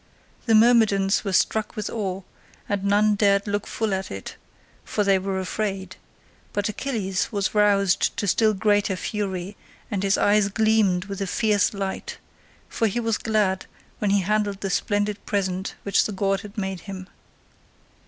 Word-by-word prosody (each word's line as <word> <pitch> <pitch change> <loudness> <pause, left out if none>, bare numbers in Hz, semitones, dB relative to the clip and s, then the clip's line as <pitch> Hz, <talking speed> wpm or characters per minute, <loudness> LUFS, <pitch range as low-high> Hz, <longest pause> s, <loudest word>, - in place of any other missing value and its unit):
The 225 - +5
Myrmidons 215 -4 +4
were 200 - -2
struck 215 +4 +1
with 215 - -3
awe, 195 -4 -3 0.4
and 200 -1 -2
none 205 +1 +3
dared 200 -1 +3
look 205 -1 -2
full 220 -3 -2
at 190 0 -3
it, 95 0 -7 0.5
for 210 - -1
they 195 -1 +3
were 190 0 -2
afraid; 195 0 -3 0.6
but 205 0 0
Achilles 215 -5 -2
was 200 -3 -1
roused 200 -3 +2
to 205 - -1
still 215 +2 +3
greater 205 -1 +2
fury, 195 -1 -4 0.4
and 200 -3 -1
his 195 0 +2
eyes 205 -1 +3
gleamed 215 -4 +2
with 200 -1 -6
a 195 - -1
fierce 210 +1 +2
light, 195 -2 -4 0.5
for 225 - 0
he 220 +3 -1
was 225 -2 0
glad 205 -4 0 0.3
when 210 - 0
he 200 0 +3
handled 205 +1 -1
the 195 - -2
splendid 205 +2 -1
present 190 -2 -2
which 200 - +2
the - - -2
god 195 0 0
had 210 +2 -12
made 190 -2 -3
him. 190 -1 -8
200 Hz, 165 wpm, -24 LUFS, 195-210 Hz, 0.6 s, The